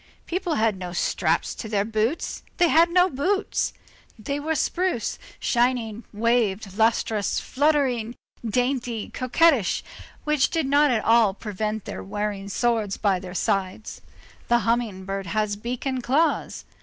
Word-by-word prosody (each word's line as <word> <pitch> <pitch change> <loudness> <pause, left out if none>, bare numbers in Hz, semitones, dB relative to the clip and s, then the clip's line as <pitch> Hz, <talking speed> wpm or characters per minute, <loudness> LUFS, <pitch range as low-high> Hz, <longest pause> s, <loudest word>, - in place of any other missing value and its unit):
People 350 -1 -2
had 215 -2 +1
no 180 -1 -6
straps - - 0
to 220 - -7
their 205 -2 +1
boots, 225 +7 -1 0.2
they 345 -1 +4
had 330 +2 +5
no 360 +1 +4
boots. 375 +7 0 0.5
They 280 +6 -3
were 320 +2 -1
spruce, 355 - -1 0.2
shining, 240 -2 0
waved, 215 -3 0
lustrous, 220 -1 +1
fluttering, 260 -5 +1 0.3
dainty, 245 -1 -1
coquettish, 255 - +2 0.4
which 300 -3 +2
did 325 -3 0
not 285 +2 +4
at 235 -4 0
all 225 -4 +4
prevent 215 0 -4
their - - -6
wearing 200 - -3
swords 220 -2 0
by 195 -3 +1
their 180 0 -9
sides. 195 +3 -2 0.5
The 240 - +4
humming 225 -5 0
bird 195 -1 -4
has 210 +3 0
beak 240 +5 -5
and 260 -2 -1
claws. 285 +7 0
230 Hz, 140 wpm, -24 LUFS, 205-275 Hz, 0.5 s, had